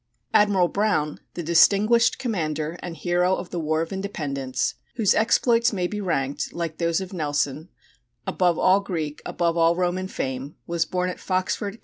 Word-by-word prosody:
Admiral 200 -4 +4
Brown, 185 -7 0 0.2
the 175 - -4
distinguished 205 +8 +4
commander 160 - -2
and 170 -2 -6
hero 180 +4 +1
of 175 - -7
the 175 - -3
War 155 0 0
of 165 - -7
Independence, 140 -10 -2 0.2
whose 220 -5 +3
exploits 235 +1 +3
may 185 -4 -1
be 210 +3 -3
ranked, 140 -7 -2
like 165 -2 -4
those 170 +1 +1
of 190 0 -7
Nelson, 145 -1 -2 0.6
"above 175 -3 +1
all 185 +1 +4
Greek, 160 -7 -4
above 170 -1 0
all 165 0 +4
Roman 180 +1 -1
fame," 135 -3 -4
was 170 -1 0
born 180 +2 -1
at - - -10
Foxford, 190 +2 -1
Co. - - -14
175 Hz, 165 wpm, -24 LUFS, 155-195 Hz, 0.6 s, Admiral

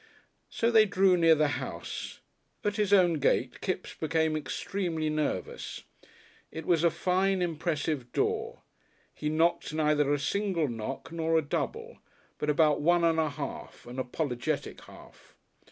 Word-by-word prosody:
So 230 +1 0
they 220 -2 +6
drew 190 -1 +4
near 165 -2 +5
the 155 0 +2
house. - - -6 0.4
At 205 0 -1
his 210 -2 +1
own 175 -5 +5
gate 130 -2 +1
Kipps 185 -1 -3
became 160 0 0
extremely 160 0 -2
nervous. 155 -1 -3 0.7
It 160 -1 -7
was 170 -2 +2
a 170 - +6
fine, 190 +3 +1
impressive 155 -6 -2
door. - - -1 0.5
He 150 - -3
knocked 165 0 +1
neither 150 -2 +2
a 145 - +3
single 180 +1 0
knock 120 +5 -5
nor 165 -1 +1
a 160 - +2
double, 455 - -4 0.4
but 150 - -1
about 150 -1 +3
one 175 +2 +3
and 165 -1 +3
a 155 -1 +1
half 145 0 -7
an 125 +2 -7
apologetic 125 -1 -3
half. - - -16
160 Hz, 145 wpm, -29 LUFS, 150-180 Hz, 0.7 s, they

